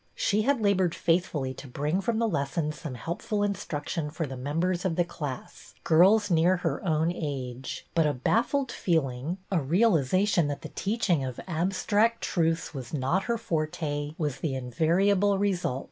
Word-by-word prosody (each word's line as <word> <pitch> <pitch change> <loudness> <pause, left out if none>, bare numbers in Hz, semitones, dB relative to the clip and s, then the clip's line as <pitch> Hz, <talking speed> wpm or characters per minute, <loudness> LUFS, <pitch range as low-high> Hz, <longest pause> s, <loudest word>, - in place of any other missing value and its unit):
She 210 0 +1
had 270 +1 +1
la 200 -1 +5
bored 185 -3 +1
faithfully 160 -6 0
to 135 - -10
bring 150 +8 -1
from 225 +3 0
the 230 0 +2
lessons 150 -2 -2
some 150 -6 -5
helpful 190 - -2
instruction 160 -5 -3
for 160 +2 -3
the 135 -2 -6
members 165 +7 -1
of 180 -3 0
the 175 - +3
class, 145 -7 -7
girls 195 +5 +5
near 175 +3 +4
her 175 - -2
own 160 -1 +1
age; 135 -6 -5
but 165 -2 +3
a 145 - +1
baffled 240 - +1
feeling, 155 -1 -1
a 185 - +3
realization 175 - +3
that 145 -1 -4
the - - -6
teach 215 +3 -2
ing 155 -6 +3
of 130 -2 -5
abstract 195 +6 +1
truths 165 -1 0
was 130 0 -5
not 150 +8 0
her 235 -1 0
forte, 155 -6 -2
was 150 -5 -2
the 145 -5 -2
invariable 180 +10 +2
result. 185 -10 0
165 Hz, 170 wpm, -28 LUFS, 145-195 Hz, -, la